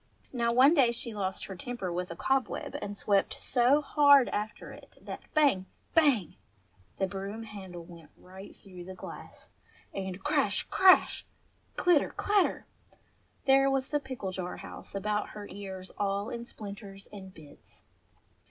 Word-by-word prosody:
Now 235 -2 +1
one 260 +6 +6
day 265 -7 +5
she 235 -1 -5
lost 195 -2 -3
her 190 - -7
temper 190 -2 -5
with 180 +1 -3
a 170 - -6
cobweb 265 +7 -1
and 205 0 -5
swept 200 -1 +1
so 260 +4 +3
hard 285 -3 +6
after 210 +1 -4
it - - -15
that - - -8
bang! 275 -12 +3 0.3
bang! 275 - +3 0.6
the 195 - +1
broom 195 +4 -5
handle 190 -5 -9
went 165 -3 -14
right 190 +2 -12
through 180 -3 -12
the 190 +1 -8
glass, - - -11 0.4
and 190 -1 -5
crash! 295 -1 +2
crash! 375 -1 +5 0.5
clitter! 350 -5 +3
clatter! 405 -2 +1 0.8
there 270 0 +5
was 270 -1 0
the 295 - +1
pickle 260 -8 -5
jar 180 -1 -5
house - - -9
about 210 +1 -1
her 205 - -7
ears 190 -1 -7
all 200 0 -1
in 235 0 -5
splinters 200 -3 -9
and 190 -2 -10
bits. 150 -3 -16
205 Hz, 150 wpm, -30 LUFS, 190-265 Hz, 0.8 s, one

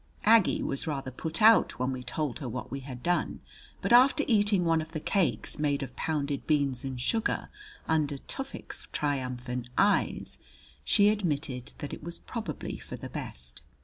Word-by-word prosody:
Aggie 220 -2 +5
was 135 - -2
rather 135 -4 -3
put 160 - -2
out 225 +1 +6
when 130 +1 0
we 130 -1 -4
told 145 +1 -3
her 135 -5 -4
what 125 +2 -5
we 135 - -3
had 130 -2 -9
done; 175 0 0 0.4
but - - +2
after 260 +4 +6
eating 205 -5 +4
one 165 -1 +3
of 160 +1 -9
the 155 - -2
cakes 185 -2 0
made 145 -2 +1
of 130 -2 -8
pounded 145 -3 -2
beans 140 -4 +1
and 130 -2 -4
sugar, 225 - 0 0.4
under 150 -3 +1
Tufik's 270 - -4
triumphant 125 -3 -2
eyes, 205 +1 +2 0.4
she 205 -1 +5
admitted 150 - -1
that 145 - -6
it - - -7
was 170 +1 -5
probably 215 - -5
for - - -8
the - - -8
best. 65 -1 -8
150 Hz, 170 wpm, -29 LUFS, 130-190 Hz, 0.4 s, out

